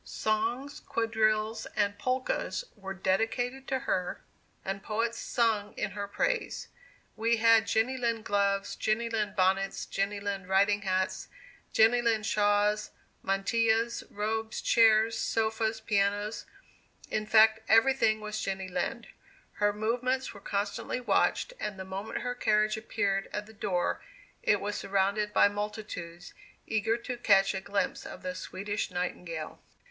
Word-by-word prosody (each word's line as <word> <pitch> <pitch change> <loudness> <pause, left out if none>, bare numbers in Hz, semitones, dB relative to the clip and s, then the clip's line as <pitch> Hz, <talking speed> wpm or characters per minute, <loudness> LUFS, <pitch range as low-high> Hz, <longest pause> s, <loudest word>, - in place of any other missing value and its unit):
Songs, 230 +6 -2
quadrilles 220 -1 0
and 205 -1 +1
polkas 255 - -1
were 195 -2 -7
dedicated 235 +7 -1
to 265 - 0
her, 180 -8 -1 0.5
and 195 +1 -3
poets 225 +3 -2
sung 215 -3 0
in 205 - -2
her 200 +1 -4
praise. - - -1 0.5
We 230 +1 +2
had 225 -2 +5
Jenny 225 +4 +1
Lind 230 -2 -1
gloves, 200 -1 +1
Jenny 230 +2 0
Lind 210 -2 -1
bonnets, 195 +1 +1
Jenny 200 +1 -2
Lind 200 -2 -4
riding 200 +2 +3
hats, 190 -1 -1 0.4
Jenny 225 +2 +5
Lind 225 -3 +1
shawls, 210 0 +2 0.3
mantillas, 225 +4 +1
robes, 220 +2 -2
chairs, 225 0 +4
sofas, 220 0 0
pianos 205 0 0 0.6
in 215 0 -1
fact, 220 0 +6
every 225 +4 +6
thing 215 -4 +2
was 215 0 -4
Jenny 190 -1 -3
Lind. 180 - -2 0.6
Her 205 0 +4
movements 245 +5 -1
were 200 - -12
constantly 200 +5 -2
watched, 250 - +1
and 205 -2 -4
the 190 - -6
moment 195 +3 -5
her 245 0 -2
carriage 215 -3 +2
appeared 205 -3 -1
at 210 - -4
the 220 - -15
door, 185 -4 -1 0.4
it 205 - +3
was 205 +1 -3
surrounded 200 +2 0
by - - +6
multitudes, 205 -4 -6 0.3
eager 220 +1 +1
to 245 +1 -5
catch 195 -4 +4
a 190 - -3
glimpse 200 +1 -1
of - - -9
the 185 - -3
Swedish 200 +3 -4
Nightingale. 175 -3 -4
215 Hz, 140 wpm, -29 LUFS, 200-225 Hz, 0.6 s, fact